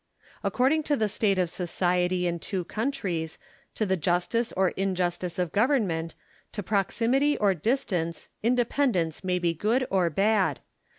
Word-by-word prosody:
According 275 +5 +2
to 290 - +2
the 215 - +1
state 200 -1 +1
of 180 -1 +2
society 180 0 0
in 170 -1 -1
two 185 +1 -3
countries, 195 - -3 0.4
to 215 - 0
the 190 -1 +1
justice 180 +8 0
or 190 -1 +2
injustice 180 -2 -2
of 180 -3 -1
government, 200 - +1 0.4
to 205 - -4
proximity 235 +9 +1
or 200 -2 +3
distance, 180 - -1
independence 235 - +1
may 180 -1 +1
be 175 -2 +1
good 225 +10 +1
or 185 -3 +3
bad. 200 +4 +1
190 Hz, 140 wpm, -27 LUFS, 175-230 Hz, 0.4 s, or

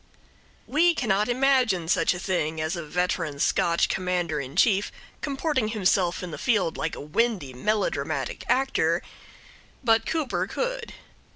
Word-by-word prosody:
We 335 +4 +3
cannot 215 -4 +1
imagine 245 -9 +2
such 180 - +2
a - - -5
thing 160 -4 -1
as 155 +3 -1
a 170 - -4
veteran 165 -2 -1
Scotch 170 +3 +2
Commander 180 -4 -1
in 140 +1 -7
Chief 200 +1 +3 0.3
comporting 275 -4 -1
himself 190 -4 +1
in 180 - -5
the - - -7
field 205 -9 +1
like - - -3
a - - -8
windy 165 - -1
melodramatic 210 +12 -1
actor, 270 +1 +2 0.8
but 225 -2 +3
Cooper 315 -5 -1
could. - - -3
195 Hz, 135 wpm, -26 LUFS, 170-250 Hz, 0.8 s, We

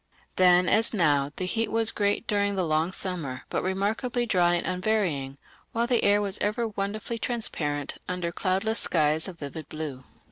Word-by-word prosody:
Then 180 -1 +5
as 225 +3 +3
now 145 -6 +2
the 185 - -2
heat 225 +4 -1
was 225 0 +3
great 205 +2 0
during 205 -1 +1
the 185 -2 0
long 160 +2 +1
summer, 165 -10 -4
but - - -1
remarkably 220 +6 -1
dry 175 -5 +3
and 170 - -2
unvarying, 180 -8 -1 0.4
while 230 +1 +1
the 240 -1 +1
air 205 0 +5
was 200 -1 0
ever 225 +3 0
wonderfully 215 +2 -4
transparent 150 - -2 0.2
under 180 -2 -2
cloudless 195 +5 0
skies 155 0 +3
of 185 -3 -8
vivid 150 0 -7
blue. 150 -4 -5
185 Hz, 170 wpm, -27 LUFS, 160-215 Hz, 0.4 s, Then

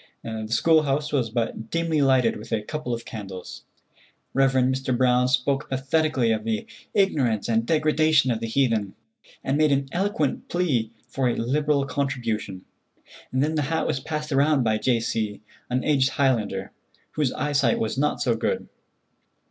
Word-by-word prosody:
The 110 -1 -5
school 160 +7 +4
house 150 +1 -1
was 125 -5 +1
but 115 -1 -3
dimly 165 -2 0
lighted 130 -4 +3
with 105 - -10
a 110 -2 0
couple 150 +1 -4
of 115 0 -3
candles. 95 -4 -8 0.7
Rev. 135 0 +3
Mr. 130 0 +1
Brown 125 0 +3
spoke 135 +2 0
pathetically 135 -2 +1
of 110 -1 -1
the 110 -1 -2 0.3
ignorance 130 - +2
and 115 0 +1
degradation 155 -3 +3
of 115 - -1
the 115 - -3
heathen, 115 -5 0 0.5
and 135 +3 0
made 155 -1 +4
an 140 0 +1
eloquent 180 -6 -1
plea 145 -11 0 0.2
for 125 +1 0
a - - 0
liberal 145 +3 +1
contribution. 115 -9 -3 0.7
Then 140 +5 +1
the 155 - +1
hat 160 0 0
was 145 - -1
passed 150 +1 -4
round 140 0 +3
by 110 -1 +1
J. 120 -1 +2
C., 110 -2 -2 0.3
an 125 +1 0
aged 135 -3 +3
Highlander, 110 -8 0 0.4
whose 150 -4 0
eyesight 140 -5 +1
was 110 - -1
not 145 +3 0
too 120 -3 +2
good. 110 - -2
130 Hz, 160 wpm, -24 LUFS, 115-150 Hz, 0.7 s, school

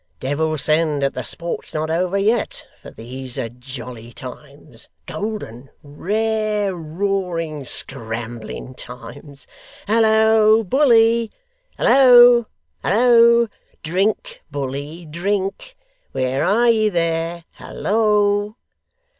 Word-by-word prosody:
Devil 155 +4 -1
send 155 -1 +1
that 140 - 0
the 130 - -4
sport's 170 +6 -5
not 155 +1 -2
over 180 +3 0
yet, 215 +4 0 0.2
for - - -11
these 125 +2 -8
are 115 - -3
jolly 125 -1 -10
times; - - -8 0.2
golden, 140 - -6
rare, 210 +6 -1
roaring, 165 -3 -3
scrambling 115 -1 -3
times. 135 +3 -10 0.4
Hallo, 220 0 +4
bully! 230 -1 +3 0.5
Hallo! 245 -3 +6 0.4
Hallo! 235 +2 +5 0.4
Drink, 215 - -1
bully, 145 +4 -5
drink. 195 - -3 0.4
Where 130 +2 -1
are 215 +7 +3
ye 215 -1 +2
there! 165 -1 -2
Hallo! 210 -1 0
180 Hz, 95 wpm, -20 LUFS, 140-220 Hz, 0.5 s, Hallo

